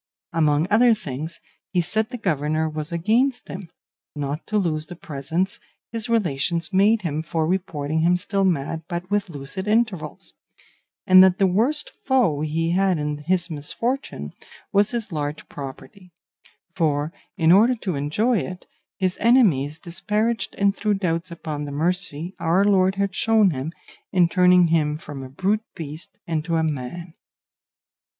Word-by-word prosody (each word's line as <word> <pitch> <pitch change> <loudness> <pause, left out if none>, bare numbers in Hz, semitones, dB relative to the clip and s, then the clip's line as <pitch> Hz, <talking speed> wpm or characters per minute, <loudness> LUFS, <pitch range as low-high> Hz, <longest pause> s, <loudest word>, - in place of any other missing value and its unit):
Among 155 -1 +3
other 230 +2 +6
things, 150 -1 -6 0.3
he 180 - 0
said 215 +6 0
the 250 - -5
governor 155 - 0
was 155 +1 -5
against 230 +10 +1
him, 185 -2 -7 0.5
not 145 +2 -4
to 215 - 0
lose 160 -5 -1
the 175 - -8
presents 165 +2 -3 0.3
his 230 0 -3
relations 170 -4 0
made 210 +3 +4
him 155 -2 -1
for 160 0 -1
reporting 160 -4 -1
him 175 +2 +4
still 195 +1 -1
mad 160 -3 0
but 175 +1 -5
with 205 -2 0
lucid 155 +6 -6
intervals; 205 - 0 0.7
and 185 0 +9
that 190 -1 +4
the 195 - +3
worst 230 +12 +1
foe 235 - +2
he 165 +2 0
had 190 0 +2
in 150 0 -2
his 175 +3 0
misfortune 230 - -3 0.4
was 205 +1 +4
his 235 -4 -2
large 150 -1 -4
property; 140 +7 -9 0.6
for 155 -2 0 0.2
in 165 -2 +4
order 225 +7 +6
to 200 -5 -3
enjoy 190 - +1
it 185 0 -6 0.3
his 185 -1 -1
enemies 175 - +3
disparaged 210 +6 -2
and 200 0 +2
threw 210 0 0
doubts 170 -2 -1
upon 155 -3 -5
the 145 - -6
mercy 170 +2 -1
our 170 +3 +3
Lord 190 -2 +3
had 200 -1 -1
shown 220 -3 +3
him 140 +2 -4 0.4
in 180 -2 +4
turning 180 -1 +5
him 150 -2 +2
from 145 -3 -8
a 130 - -8
brute 195 +10 0
beast 155 -1 -7 0.2
into 165 0 -1
a 160 - +2
man. 155 +3 -4
175 Hz, 155 wpm, -23 LUFS, 155-200 Hz, 0.7 s, and